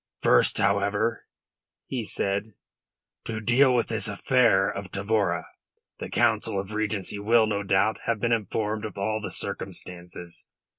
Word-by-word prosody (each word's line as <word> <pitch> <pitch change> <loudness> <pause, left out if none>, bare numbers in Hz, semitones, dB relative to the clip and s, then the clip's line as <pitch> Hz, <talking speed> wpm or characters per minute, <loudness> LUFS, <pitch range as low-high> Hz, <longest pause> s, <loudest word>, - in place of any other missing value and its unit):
"First, - - +4
however," 100 +3 +1 0.6
he 125 -3 -3
said, 100 0 -2 0.7
"to 110 -1 -3
deal 125 +4 +4
with 120 - +1
this 110 -1 -1
affair 105 -2 +3
of 100 -1 -5
Tavora. 100 -4 0 0.5
The - - -5
Council 100 - +1
of 100 +2 -6
Regency 105 -2 -2
will, 110 +2 +4
no 105 -2 -1
doubt, 100 +2 +1
have 115 -2 +1
been 120 +2 0
informed 110 0 -1
of 105 -3 -6
all 110 +2 -1
the - - -4
circumstances. 90 -1 -5
105 Hz, 140 wpm, -26 LUFS, 100-110 Hz, 0.7 s, First